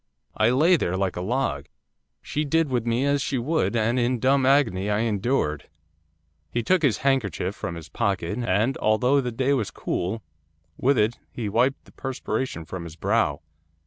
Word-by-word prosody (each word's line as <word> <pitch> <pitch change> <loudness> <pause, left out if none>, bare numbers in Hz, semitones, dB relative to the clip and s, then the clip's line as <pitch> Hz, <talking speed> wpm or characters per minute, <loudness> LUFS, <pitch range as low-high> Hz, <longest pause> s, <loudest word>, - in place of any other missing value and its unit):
I 110 +1 +3
lay 160 +8 +4
there 95 - -1
like 95 -1 -1
a 90 - -3
log. 95 - -1 0.6
She 150 - -2
did 155 0 +1
with 120 -2 0
me 120 +4 +1
as 140 0 +2
she 140 - -1
would, 135 +1 0
and 115 +2 +1
in 125 +1 +1
dumb 130 +2 +3
agony 115 -9 +3
I 105 +1 +1
endured.' 105 - -1 0.8
He 120 +8 -2
took 185 +7 +3
his 140 -8 +2
handkerchief 100 - +1
from 85 - -5
his 85 -1 -9
pocket, 100 +2 -1
and, 115 +3 +1
although 125 +6 +3
the 125 -2 -3
day 130 +4 +1
was 120 -7 0
cool, 100 +5 -3 0.5
with 135 +1 +2
it 110 +3 +1
he 115 -3 -4
wiped 125 +6 +1
the - - -18
perspiration 130 -8 -4
from 90 +2 -6
his 80 -1 -9
brow. 95 -5 +1
120 Hz, 175 wpm, -25 LUFS, 100-135 Hz, 0.8 s, lay